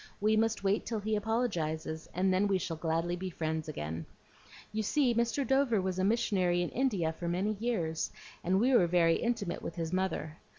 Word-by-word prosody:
We 215 +1 +3
must 220 -1 +1
wait 200 +1 +2
till 225 -2 -2
he 215 +1 -1
apologizes, 175 -8 -1
and 185 +1 +2
then 195 +2 +3
we 195 -1 +2
shall 170 -2 -3
gladly 165 +2 -1
be 185 +1 -4
friends 160 -2 -3
again. 80 - -5 0.7
You 220 - 0
see 250 +3 +2
Mr. 235 +4 +1
Dover 265 -4 +3
was 185 0 -2
a - - +2
missionary 190 -5 +2
in 175 - -2
India 200 -11 0
for 170 +1 -5
many 185 +5 0
years, 175 -9 -1 0.3
and 185 +2 +2
we 255 +5 +3
were 185 -8 +5
very 165 -1 +4
intimate 230 -7 -2
with 165 - -6
his 165 -1 -3
mother. 185 -4 -1
190 Hz, 195 wpm, -31 LUFS, 165-220 Hz, 0.7 s, were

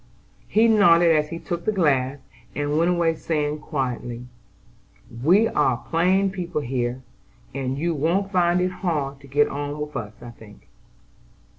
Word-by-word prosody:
He 220 +2 +3
nodded 175 -6 +5
as 150 0 0
he 165 - -5
took 170 0 -5
the - - +2
glass, 140 -8 +1 0.4
and 145 +1 -1
went 165 +3 +2
away 170 -2 +2
saying 150 -2 -2
quietly: 125 -5 -4 1.0
"We 195 +9 +5
are 130 - +1
plain 185 +7 +1
people 175 -4 -4
here, 125 -1 -3 0.5
and 135 0 -3
you 170 +3 -1
won't 170 +7 0
find 175 -2 +2
it 180 0 0
hard 150 -7 -3
to 140 - -15
get 145 +2 +2
on 145 +1 -5
with 150 0 -6
us, 105 -2 -5
I 120 - -10
think." 110 -3 -17
150 Hz, 155 wpm, -23 LUFS, 135-175 Hz, 1.0 s, nodded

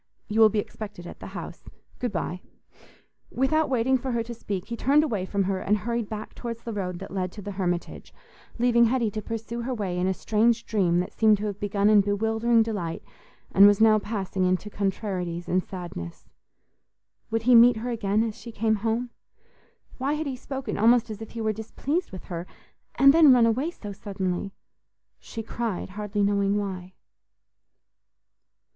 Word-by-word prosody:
You 215 +2 -1
will 220 -1 +8
be 215 - -2
expected 205 -3 -5
at - - -10
the - - -8
house. - - -8 0.3
Good 245 - -2
bye." 180 -1 -3 0.9
Without 310 +4 +1
waiting 260 +1 +2
for 260 +1 -3
her 230 -1 0
to 235 +1 -7
speak, 200 -5 -5
he 235 - -3
turned 285 +5 +3
away 210 -11 -2
from 200 0 0
her 190 0 -1
and 210 +3 +1
hurried 235 +1 -3
back 215 -1 -6
towards 230 -1 -6
the 230 - -5
road 180 -3 -3
that 195 +2 -9
led 185 -2 -2
to 210 - -8
the 205 - -5
Hermitage, 175 -3 -3 0.5
leaving 235 -1 +4
Hetty 235 -2 +1
to 215 - -4
pursue 230 +2 -5
her 255 +2 -3
way 190 -5 -2
in 180 - +1
a 190 - +2
strange 230 +3 +1
dream 180 -5 +2
that 180 - -6
seemed 215 -2 +4
to 210 - -4
have 205 -1 -4
begun 205 0 +1
in 210 -1 +6
bewildering 225 +3 +2
delight 200 -7 -4 0.5
and 200 +1 +8
was 205 -1 +4
now 220 -1 +6
passing 195 -3 -3
into 185 +3 0
contrarieties 185 -4 -3
and 185 0 +1
sadness. 175 - -8 1.0
Would 225 0 -1
he 250 +2 +5
meet 240 0 +7
her 240 +3 -3
again 215 -2 +1
as 225 -2 -2
she 235 - -10
came 220 0 +1
home? 230 +3 -1 0.9
Why 275 +3 0
had 310 +1 -2
he 270 -2 -3
spoken 270 0 -5
almost 230 +1 +4
as 215 0 -7
if 220 - -7
he 230 - -4
were 215 -1 0
displeased 280 - -3
with 185 - -8
her? 175 0 -6 0.5
And 275 0 +7
then 315 -3 +7
run 245 -2 +6
away 250 +8 +1
so 210 -12 -8
suddenly? 195 -2 -3 0.7
She 225 - -7
cried, 225 -5 -3
hardly 205 +1 -2
knowing 200 0 +2
why. 185 -2 -5
215 Hz, 185 wpm, -26 LUFS, 195-235 Hz, 1.0 s, will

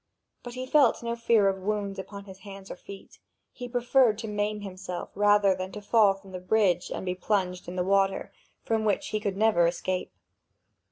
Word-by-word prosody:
But 245 0 -9
he 255 0 -4
felt 265 -4 +3
no 235 0 -2
fear 230 -3 +3
of 190 0 0
wounds 200 -1 -2
upon 200 +1 -8
his 190 -1 -12
hands 195 -1 -10
or - - -5
feet; 195 +2 -13 0.3
he 245 -1 -8
preferred 245 -2 +3
to 225 0 -5
maim 210 0 -2
himself 185 -2 -6
rather 205 -1 +4
than 185 0 -5
to 210 - -6
fall 205 -2 +4
from 195 0 -15
the 185 - -6
bridge 185 -2 +1
and - - -5
be 180 - -1
plunged 180 -1 -1
in 175 - -6
the 180 - 0
water 195 +1 +1 0.3
from 225 -1 0
which 210 -2 0
he 215 - -1
could 200 -2 -3
never 210 -6 +4
escape. 180 +1 -2
200 Hz, 200 wpm, -27 LUFS, 190-220 Hz, 0.3 s, rather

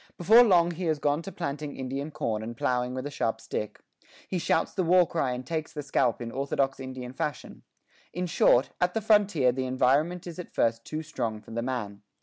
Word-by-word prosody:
Before 215 +7 +7
long 175 -6 +4
he 175 +2 -5
has 160 -2 +1
gone 145 +1 0
to 195 - -7
planting 145 -3 -4
Indian 135 +3 -4
corn 110 -7 -2
and 115 +1 -7
plowing 125 +1 0
with 130 +1 -4
a 145 - -4
sharp 115 -4 -1
stick; 105 -1 -5 0.5
he 185 - -2
shouts 165 - +1
the 195 - 0
war 175 0 +5
cry 145 -6 -1
and 125 +1 -6
takes 155 +2 -3
the 150 -1 -5
scalp 125 -4 +1
in 115 - -6
orthodox 135 0 -1
Indian 130 -1 -7
fashion. 145 +1 -5 0.5
In 180 +2 -3
short, 135 -6 +3
at 180 0 +1
the 225 - +1
frontier 205 - +4
the 130 +1 -3
environment 145 +8 +1
is 175 -1 -8
at 180 - -9
first 115 0 +1
too 155 +1 -4
strong 115 -7 -3
for 105 - -15
the 115 +1 -2
man. 115 -5 -4
140 Hz, 210 wpm, -27 LUFS, 125-170 Hz, 0.5 s, Before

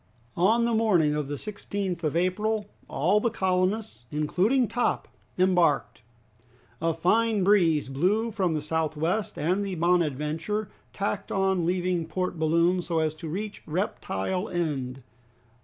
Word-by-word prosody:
On 220 +7 +3
the 235 - +1
morning 190 -9 +3
of 150 -2 -2
the 145 - -3
16th 200 -2 -4
of 155 0 0
April 210 +5 0 0.2
all 180 +9 +2
the 235 - +1
colonists, 185 - -1
including 190 - +1
Top, 245 - 0 0.3
embarked. 180 -9 +2 0.8
A 165 0 +2
fine 205 +6 +2
breeze 175 -8 +3
blew 190 +12 +1
from 185 -6 0
the 150 - -2
south 160 0 -1
west, 175 +6 -1
and 180 +6 +1
the 195 -2 -3
"Bonadventure" 170 +4 0 0.2
tacked 200 0 -3
on 190 -3 +1
leaving 180 -2 0
Port 180 +1 -3
Balloon 170 +3 +3
so 170 -1 -2
as 155 -1 +1
to 155 +1 -8
reach 205 +5 -5
Reptile 180 - -2
End. 135 -7 -3
180 Hz, 140 wpm, -27 LUFS, 160-205 Hz, 0.8 s, On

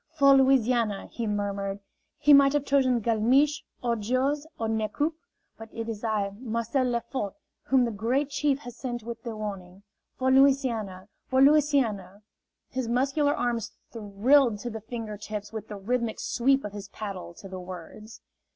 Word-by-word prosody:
"For 275 -1 +7
Louisiana!" 245 -6 +3
he 230 -2 -3
murmured. 200 -1 -2 0.4
"He 295 0 +5
might 275 0 +7
have 290 -1 0
chosen 260 -4 +2
Galmiche, 250 +7 +2 0.2
or 235 -1 +1
Jose, 265 +7 -1
or 225 - -2
Nez 220 -1 -1
Coupe; 305 +6 -1 0.4
but 225 0 -9
it 230 0 -5
is 225 -1 -5
I, 210 -3 0
Marcel 235 +2 -1
Lefort, 235 -3 -2 0.3
whom 260 -2 +3
the 235 - -2
Great 245 +7 0
Chief 285 -1 +1
has 245 -3 -9
sent 240 -2 -5
with 230 0 -7
the 230 -2 -6
warning. 195 -3 -7 0.3
For 260 0 +1
Louisiana! 250 -9 +2 0.2
For 260 - +1
Louisiana!" 265 -9 +3 0.5
His 260 -3 -2
muscular 275 +4 +1
arms 235 -3 -2 0.2
thrilled 230 +3 +3
to 240 - -4
the 220 0 -6
finger 220 -1 -6
tips 210 0 -6
with 220 -1 -6
the 210 - -7
rhythmic 235 +3 -2
sweep 270 +3 +1
of 205 - -6
his 205 -1 -8
paddle 195 -5 -7
to 195 - -11
the 190 -1 -7
words. 185 +4 -10
235 Hz, 165 wpm, -27 LUFS, 210-265 Hz, 0.5 s, For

